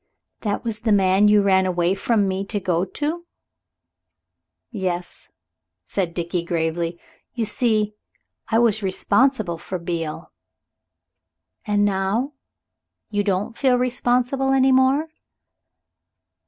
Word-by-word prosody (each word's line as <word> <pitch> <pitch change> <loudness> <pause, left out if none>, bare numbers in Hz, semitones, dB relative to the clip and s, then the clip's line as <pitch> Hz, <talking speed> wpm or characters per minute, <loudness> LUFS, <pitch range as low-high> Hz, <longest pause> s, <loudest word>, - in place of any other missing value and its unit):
"That 205 -2 -2
was 225 -3 -3
the 225 0 0
man 195 0 +4
you 210 -1 +5
ran 190 -1 +3
away 175 0 +1
from 205 +1 +1
me 190 +1 -2
to 205 +1 -2
go 180 -1 0
to?" 315 - -4 1.4
"Yes," 180 -5 -4 0.6
said 180 -4 -2
Dickie 170 0 -2
gravely; 170 0 -2 0.4
"you 230 -2 -1
see, 215 -3 +1 0.6
I 225 - +2
was 225 -2 +3
responsible 200 -1 +1
for 185 - -5
Beale." 165 -2 -5 1.4
"And 205 0 +2
now? 205 +8 0 0.8
Don't 205 -1 0
you - - -16
feel 255 +1 +2
responsible 250 +2 +1
any 265 0 +4
more?" 265 +4 +3
205 Hz, 115 wpm, -22 LUFS, 185-240 Hz, 1.4 s, you